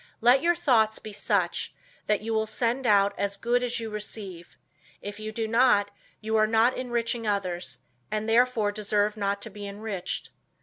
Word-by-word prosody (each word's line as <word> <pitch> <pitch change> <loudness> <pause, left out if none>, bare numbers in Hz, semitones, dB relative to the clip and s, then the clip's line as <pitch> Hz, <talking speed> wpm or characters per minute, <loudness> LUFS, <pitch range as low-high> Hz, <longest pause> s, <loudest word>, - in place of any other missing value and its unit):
Let 245 +3 +5
your 345 +2 +3
thoughts 230 -10 +3
be 215 - -8
such, - - -1 0.3
that 210 -1 +2
you 225 +1 -3
will 220 0 +1
send 240 +3 0
out 200 -1 +4
as 200 0 -1
good 240 +3 +1
as 245 -1 -1
you 225 -1 -5
receive; 205 -4 -6 0.4
if 205 +1 -7
you 215 0 -5
do 220 0 -2
not, 230 -3 +3 0.3
you 220 0 -1
are 215 0 +4
not 225 +3 +3
enriching 235 -2 -2
others, 185 -4 -2 0.3
and 215 0 -2
therefore 230 -2 +3
deserve 210 0 0
not 200 -1 -2
to 225 - -7
be 205 0 -7
enriched. 200 -2 -4
215 Hz, 175 wpm, -27 LUFS, 205-235 Hz, 0.4 s, Let